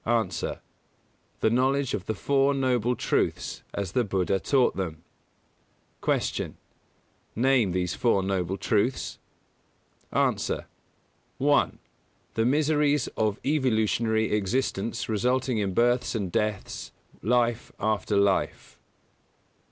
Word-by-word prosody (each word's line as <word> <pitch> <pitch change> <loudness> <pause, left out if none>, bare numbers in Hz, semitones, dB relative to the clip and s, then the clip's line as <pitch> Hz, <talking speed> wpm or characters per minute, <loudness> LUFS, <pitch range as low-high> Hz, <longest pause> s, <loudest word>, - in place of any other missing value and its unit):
_ 115 -1 0
A. - - -7 0.8
The - - +4
knowledge 135 +2 +2
of 95 - -3
the 110 - -1
"Four 140 +6 +2
Noble 125 -3 +1
Truths," - - -1
as 100 -3 -3
the 125 - +2
Buddha 95 -2 0
called 130 +5 +2
them. 80 -4 -4 1.0
121. - - -1
Q. - - -30 0.9
Name 130 -7 +4
these 90 -1 -1
Four 105 -5 +2
Noble 95 -1 -1
Truths? 115 +6 0 0.9
A. - - 0 0.7
1. 145 +2 +2 0.6
The 110 - +1
miseries 150 0 +2
of 110 -1 -1
evolutionary 110 -5 +1
existence 105 +1 -1
resulting 125 +2 +1
in 95 -3 -1
births 120 +1 +2
and 100 -5 -2
deaths, 105 0 -2 0.3
life 120 +1 +1
after 105 -1 0
life. 100 -1 0
115 Hz, 110 wpm, -27 LUFS, 100-130 Hz, 1.0 s, The